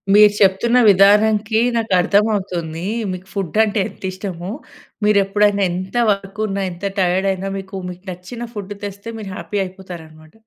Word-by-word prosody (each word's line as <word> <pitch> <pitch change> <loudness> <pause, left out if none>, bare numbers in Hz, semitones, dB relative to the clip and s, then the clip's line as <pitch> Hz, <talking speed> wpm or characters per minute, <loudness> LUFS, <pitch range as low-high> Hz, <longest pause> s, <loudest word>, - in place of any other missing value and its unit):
మీరు 210 0 +7
చెప్తున్న 205 +5 +3
విధానంకి 210 +3 +4 0.2
నాకు 225 -4 -1
అర్థమవుతుంది. 185 -5 0 0.3
మీకు 185 +1 -7
ఫుడ్ 195 -2 -4
అంటే 210 -1 0
ఎంత - - -15
ఇష్టమో! 185 -2 -6 0.5
మీరు 210 -1 +4
ఎప్పుడైనా 205 +1 +2
ఎంత 185 +5 -5
వర్క్ 200 0 -2
ఉన్నా 195 -1 -2
ఎంత 175 +3 -8
టైర్డ్ 185 +1 +2
అయినా 190 +1 -4
మీకు 195 0 -8
మీకు 180 +1 -10
నచ్చిన 230 +7 -7
ఫుడ్ 205 -1 -6
తెస్తే 200 +2 -6
మీరు 200 -2 -7
హ్యాపీ 205 - -5
అయిపోతారనమాట. 170 -4 -11
195 Hz, 150 wpm, -19 LUFS, 185-210 Hz, 0.5 s, మీరు